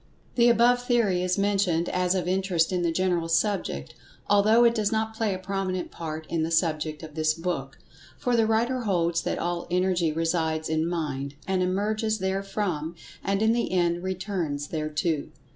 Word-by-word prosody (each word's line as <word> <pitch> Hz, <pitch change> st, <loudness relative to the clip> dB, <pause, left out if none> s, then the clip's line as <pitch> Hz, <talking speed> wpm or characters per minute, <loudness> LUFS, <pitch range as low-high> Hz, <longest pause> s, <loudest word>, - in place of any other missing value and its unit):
The 240 Hz, -1 st, +5 dB
above 240 Hz, +1 st, +4 dB
theory 230 Hz, -7 st, +2 dB
is 180 Hz, +1 st, 0 dB
mentioned 195 Hz, -4 st, +1 dB
as 180 Hz, 0 st, +1 dB
of 180 Hz, -2 st, -1 dB
interest 185 Hz, -3 st, +1 dB
in 180 Hz, -1 st, 0 dB
the 170 Hz, -1 st, +1 dB
general 175 Hz, -1 st, 0 dB
subject, 165 Hz, -, 0 dB, 0.3 s
although 215 Hz, +4 st, +5 dB
it 235 Hz, -1 st, +5 dB
does 215 Hz, -3 st, 0 dB
not 220 Hz, 0 st, -1 dB
play 220 Hz, -2 st, 0 dB
a 185 Hz, -, -2 dB
prominent 185 Hz, -1 st, -3 dB
part 160 Hz, -1 st, -6 dB
in 165 Hz, -, -1 dB
the 160 Hz, -, 0 dB
subject 155 Hz, -2 st, 0 dB
of 155 Hz, -1 st, -9 dB
this 155 Hz, 0 st, +1 dB
book, 165 Hz, -6 st, -4 dB, 0.4 s
for 245 Hz, -1 st, 0 dB
the 225 Hz, -2 st, +3 dB
writer 235 Hz, +4 st, +1 dB
holds 170 Hz, -7 st, +1 dB
that -, -, -2 dB
all 175 Hz, 0 st, -2 dB
Energy 180 Hz, -2 st, +1 dB
resides 160 Hz, -1 st, -1 dB
in 160 Hz, +1 st, +1 dB
Mind, 145 Hz, -5 st, -3 dB
and 190 Hz, -1 st, +1 dB
emerges 215 Hz, +4 st, 0 dB
therefrom, 190 Hz, -4 st, -2 dB, 0.3 s
and, 195 Hz, +2 st, 0 dB
in 220 Hz, +1 st, +4 dB
the 235 Hz, -, -1 dB
end, 175 Hz, -1 st, +1 dB
returns 180 Hz, -6 st, -3 dB
thereto. 155 Hz, 0 st, -1 dB
180 Hz, 175 wpm, -26 LUFS, 165-205 Hz, 0.4 s, The